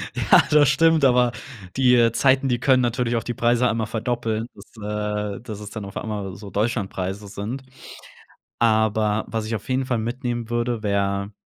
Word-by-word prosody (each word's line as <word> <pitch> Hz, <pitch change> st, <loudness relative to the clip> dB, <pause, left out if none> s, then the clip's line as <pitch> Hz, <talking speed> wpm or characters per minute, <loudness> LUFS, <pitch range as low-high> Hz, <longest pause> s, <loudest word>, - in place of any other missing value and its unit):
Ja, -, -, +5 dB
das 145 Hz, -2 st, +6 dB
stimmt, 160 Hz, +1 st, +4 dB
aber 125 Hz, -2 st, +4 dB, 0.5 s
die, 125 Hz, -2 st, +5 dB
äh, 115 Hz, -1 st, +4 dB
Zeiten, 135 Hz, +2 st, +3 dB
die 120 Hz, -1 st, +1 dB
können 130 Hz, -1 st, +4 dB
natürlich 120 Hz, 0 st, 0 dB
auch 115 Hz, -, -1 dB
die 120 Hz, -, -3 dB
Preise 120 Hz, +2 st, +2 dB
einmal 110 Hz, -1 st, -1 dB
verdoppeln, 115 Hz, 0 st, -2 dB
dass, 105 Hz, -1 st, -4 dB
äh, -, -, -16 dB
dass 110 Hz, -4 st, -8 dB
es 105 Hz, -1 st, -8 dB
dann 105 Hz, -2 st, -7 dB
auf 100 Hz, -, -8 dB
einmal 100 Hz, -4 st, -4 dB
so 100 Hz, 0 st, -10 dB
Deutschlandpreise 100 Hz, -3 st, -2 dB
sind. 105 Hz, +7 st, -6 dB, 1.0 s
Aber 110 Hz, -1 st, +2 dB
was 110 Hz, -1 st, -3 dB
ich 115 Hz, -, -2 dB
auf 105 Hz, -, -7 dB
jeden 130 Hz, 0 st, 0 dB
Fall 125 Hz, -3 st, 0 dB
mitnehmen 120 Hz, 0 st, -3 dB
würde, 120 Hz, -1 st, -1 dB
wäre 100 Hz, 0 st, -1 dB
115 Hz, 180 wpm, -23 LUFS, 105-125 Hz, 1.0 s, das